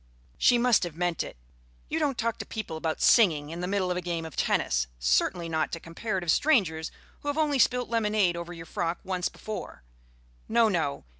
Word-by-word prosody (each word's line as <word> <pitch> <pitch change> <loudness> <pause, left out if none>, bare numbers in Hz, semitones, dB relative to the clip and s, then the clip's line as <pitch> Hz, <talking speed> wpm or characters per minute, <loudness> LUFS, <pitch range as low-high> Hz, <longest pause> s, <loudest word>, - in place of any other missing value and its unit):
She 245 - +5
must 240 -1 +4
have 175 -4 -4
meant 175 -1 -1
it. - - -7 0.5
You 320 - -1
don't 285 -5 0
talk 230 -1 -1
to - - -3
people 215 -7 -5
about 160 0 -2
singing 160 -10 +4
in 170 - -6
the 180 - -2
middle 190 -2 0
of 180 - -1
a - - -2
game 170 -2 -3
of 160 - -9
tennis; - - +1
certainly 60 - +1
not 160 -1 -1
to 165 - -3
comparative 175 +1 -2
strangers 180 - +2 0.3
who - - -10
have 290 +1 -1
only 295 -3 +2
spilt 250 0 +3
lemonade 210 -5 +1
over 170 0 -6
your 165 -1 -8
frock 170 +1 -2
once 185 -1 -1
before. 215 - -7 0.7
No, 230 0 +4
no. 160 -7 -1
180 Hz, 200 wpm, -28 LUFS, 165-230 Hz, 0.7 s, She